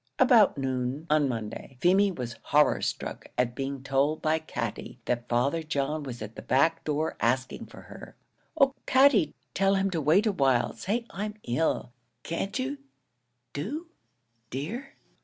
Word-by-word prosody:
About 225 - +5
noon, 130 +2 -2
on 150 -3 +4
Monday, 115 +2 -5
Feemy 195 +5 +4
was 125 -8 -6
horror 150 +1 +4
struck - - -4
at 125 -1 +1
being 135 +1 -4
told 140 +3 +1
by 160 0 +1
Katty 120 -5 -5
that 120 -1 -2
Father 135 +7 +1
John 155 -1 -1
was 125 -5 -6
at 110 +1 -8
the - - -7
back 140 +6 +2
door 155 +1 -1
asking 130 +3 0
for - - -12
her. - - -12 0.4
"Oh, 275 -1 +5
Katty, 260 - +5 0.2
tell 195 +1 +3
him 195 0 +1
to 165 -3 -1
wait 165 +9 +4
awhile; 135 - +2
say 230 +5 -2
I'm 210 +1 -4
ill, 120 0 0 0.3
can't 195 +6 -3
you 275 +2 -3 0.7
do, 290 - -4 0.6
dear!" 220 - -5
150 Hz, 150 wpm, -28 LUFS, 130-195 Hz, 0.7 s, About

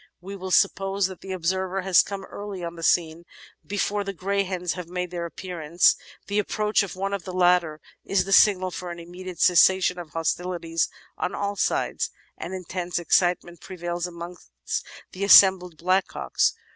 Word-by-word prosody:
"We 195 +3 -8
will 190 -1 -6
suppose 195 +1 +2
that 185 -1 -6
the 190 - -8
observer 190 +1 -1
has 185 -1 +5
come 195 -1 -6
early 200 -3 -7
on 170 0 -5
the 165 - -9
scene, 165 0 +1 0.4
before 205 0 -1
the 195 0 -5
greyhens 185 -2 -1
have 180 -2 -7
made 180 0 -4
their 170 -1 -4
appearance. 170 -1 +1 0.3
The 205 +1 -1
ap 210 - -1
proach 210 0 +1
of 200 -2 -5
one 195 +1 -3
of 200 -3 -3
the 185 - -7
latter 175 -4 +2 0.2
is 190 -2 +1
the 195 - -6
signal 185 -3 +5
for 180 0 -6
an 170 - -6
immediate 175 +1 -9
cessation 180 0 +4
of 170 -3 -8
hostilities 165 +1 -1 0.3
on 180 - -2
all 200 0 -2
sides, - - -1 0.3
and - - -7
intense 180 -1 -4
excitement 175 0 +1
prevails 175 -1 -4
amongst 170 - -10 0.6
the 190 - -5
assembled 190 -4 +6
blackcocks. 185 +3 +1
180 Hz, 170 wpm, -25 LUFS, 175-195 Hz, 0.6 s, assembled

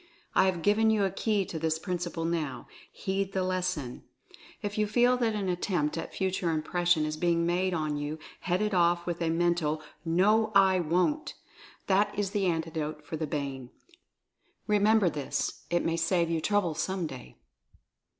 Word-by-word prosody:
I - - +5
have 175 -3 -1
given 220 +2 +4
you 215 -2 +3
a 195 - +1
key 210 -1 0
to 165 - -5
this 160 0 0
principle 175 -1 -3
now 160 -5 -2
— - - -23
heed 195 0 -1
the 190 - 0
lesson! 180 -8 -2 0.6
If 205 0 -3
you 210 - +2
feel 245 +3 +4
that 230 -3 0
an 200 -2 -2
attempt 175 -4 0
at 165 - -6
Fu 190 -1 0
ture 180 -2 -1
Impression 165 +1 +1
is 155 0 -3
being 170 0 +1
made 180 +1 +1
on 155 -2 -1
you 145 +2 -3 0.2
head 180 +3 0
it 210 -1 -1
off 175 -1 +3
with 175 -1 -3
a 165 - +1
mental 165 -2 +1 0.2
"No, 210 +7 +3
I 190 -1 +5
Wont!" 180 - 0 0.5
That 205 +1 +2
is 200 -2 -1
the 200 -3 0
Antidote 160 -2 -2
for 160 - -5
the 155 0 -3
Bane. 140 -4 -4 1.0
Remember 210 -1 +4
this 150 -4 -2
— - - -32
it 175 0 +1
may 165 0 0
save 170 0 +1
you 165 -1 0
trouble 205 -4 +1
some 185 +2 -2
day! 130 -5 -9
175 Hz, 180 wpm, -29 LUFS, 160-195 Hz, 1.0 s, I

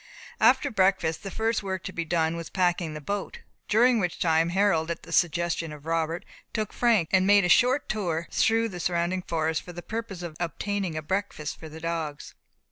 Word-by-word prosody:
After - - +4
breakfast 185 -5 +2
the 195 - -6
first 225 +3 0
work 190 -2 -4
to - - -6
be 170 - -3
done 160 0 +1
was 170 -1 -6
packing 175 -3 0
the - - -5
boat, 200 +6 -4 0.3
during 235 +2 +4
which 180 -4 -1
time 165 0 +2
Harold, 175 -3 +2
at 170 - -4
the - - -11
suggestion 170 -1 +1
of 150 -1 -11
Robert, 165 +1 -1 0.3
took 215 -2 -2
Frank, 225 -9 +2
and 190 0 +4
made 200 -2 +6
a - - +1
short 255 +9 +4
tour 170 -6 -2
through 225 +1 +2
the 180 -3 -7
surrounding 175 +2 0
forest, 160 -2 -1
for 175 - -10
the 175 0 -8
purpose 220 -5 -5
of 165 -3 -6
obtaining 180 +1 -2
a 155 - -4
breakfast 190 -4 -3
for 160 - -9
the 160 +1 -10
dogs. 160 -3 -4
175 Hz, 200 wpm, -27 LUFS, 165-200 Hz, 0.3 s, made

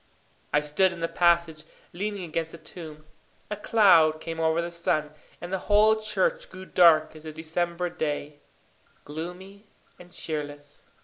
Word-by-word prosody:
I 150 - +3
stood 150 +6 +2
in 180 - -9
the 165 - -1
passage, 170 -3 +2 0.3
leaning 200 +2 -4
against 165 -1 -3
the - - -8
tomb. 155 -1 -11 0.5
A - - -1
cloud 175 -8 +4
came 165 0 -6
over 160 0 +2
the 170 0 -3
sun, 155 -3 -1 0.3
and 175 +2 -7
the 190 - 0
whole 215 +1 +6
church - - -1
grew 185 0 -10
dark 165 -4 +4
as 155 - -12
a 155 - -7
December 170 +3 -2
day 150 -3 -4 0.7
gloomy 180 +7 -8 0.3
and 180 0 -14
cheerless. 145 -3 -6
170 Hz, 150 wpm, -26 LUFS, 155-185 Hz, 0.7 s, whole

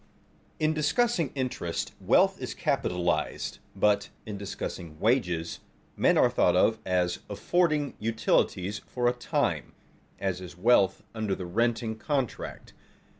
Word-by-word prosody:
In 155 0 +2
discussing 165 - +1
interest, 125 -10 -2
wealth - - +3
is - - -4
capitalized; 90 -1 -1 0.2
but, 100 +1 +2 0.2
in 105 - -5
discussing 85 -5 -6
wages, 90 -8 +1 0.4
men - - +3
are - - +6
thought - - +3
of 110 0 +3
as 90 -1 +1
affording 150 - +1
utilities 105 -3 +1
for 120 -1 0
a 120 - +3
time, 125 - -1 0.4
as 95 -2 -2
is 90 -1 -9
wealth 95 -2 +3
under 110 -4 -1
the 90 - -6
renting 110 +3 0
contract. 135 -4 -3
110 Hz, 125 wpm, -28 LUFS, 90-125 Hz, 0.4 s, are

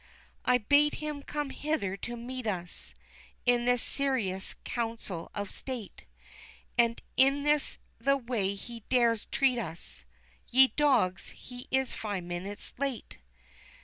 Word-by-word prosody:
"I 250 - +5
bade 285 +6 +4
him 300 -1 -4
come 295 -1 -3
hither 290 -13 -1
to 240 +4 -5
meet 250 0 -5
us, 175 -4 -3 0.5
in 245 -1 +4
this 245 -1 +3
serious 235 -10 0
Council 225 -7 -3
of 205 -1 -3
State; 250 -6 -6 0.7
And 235 -1 +3 0.2
this 285 +2 +4
is - - -18 0.2
the 275 0 +3
way 230 -6 -1
he 235 +4 -8
dares 235 -3 +3
treat 260 -3 +2
us. 165 - -6 0.4
Ye 260 +1 +7
dogs, 265 -11 +3
he 245 -1 -10
is 265 -1 +1
five 205 -4 -3
minutes 175 +4 -5
late!" 275 - -3
245 Hz, 130 wpm, -30 LUFS, 205-270 Hz, 0.7 s, Ye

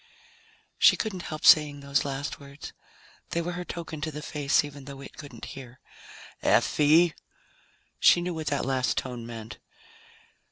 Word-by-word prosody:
She - - +7
couldn't 200 -5 -3
help 155 -2 -5
saying 145 -2 +6
those 140 0 0
last 140 +1 -4
words. 140 +1 -10 0.6
They 170 - -1
were 175 - -3
her 180 0 -5
token 165 -3 -7
to 155 - -2
the 150 0 -7
face, 145 -3 +1
even 145 -2 -9
though 140 0 -9
it - - -11
couldn't 145 -2 -10
hear. 130 -2 -11 0.6
"Effie!" 155 +3 +4 0.9
She - - +6
knew 175 0 -3
what 160 -2 -5
that 145 -1 0
last 130 -1 0
tone 120 -3 -4
meant. 115 -1 -8
145 Hz, 155 wpm, -27 LUFS, 135-160 Hz, 0.9 s, She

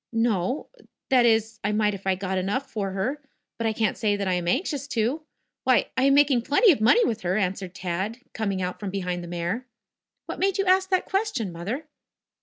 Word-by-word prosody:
"No. 225 - 0 0.4
That 250 -2 +5
is, 220 -1 +1
I 205 - +1
might 210 -1 +2
if 195 0 -7
I 190 - +3
got 190 0 -2
enough 205 +9 -2
for 200 -3 -3
her. 250 +10 -2 0.4
But 230 - 0
I - - +2
can't 215 -2 0
say 210 -2 +1
that 200 -1 -2
I 185 - +1
am 175 -1 -1
anxious 280 - -1
to. 250 +4 0 0.4
Why, 255 -1 +3
I 260 +1 +2
am 275 0 +5
making 280 -4 +4
plenty 290 - +5
of 275 - 0
money 460 - +5
with 220 -1 -2
her," 180 +2 0
answered 190 -2 -2
Tad 190 +5 -3 0.2
coining 200 -4 -2
out 180 0 -4
from 205 - -4
behind 180 -2 -3
the - - -7
mare. 175 +9 -3 0.6
"What - - -6
made 390 0 +1
you 390 - +1
ask 375 0 +3
that 370 -1 +1
question, 390 - -1
Mother?" 205 - -4
220 Hz, 210 wpm, -25 LUFS, 190-265 Hz, 0.6 s, That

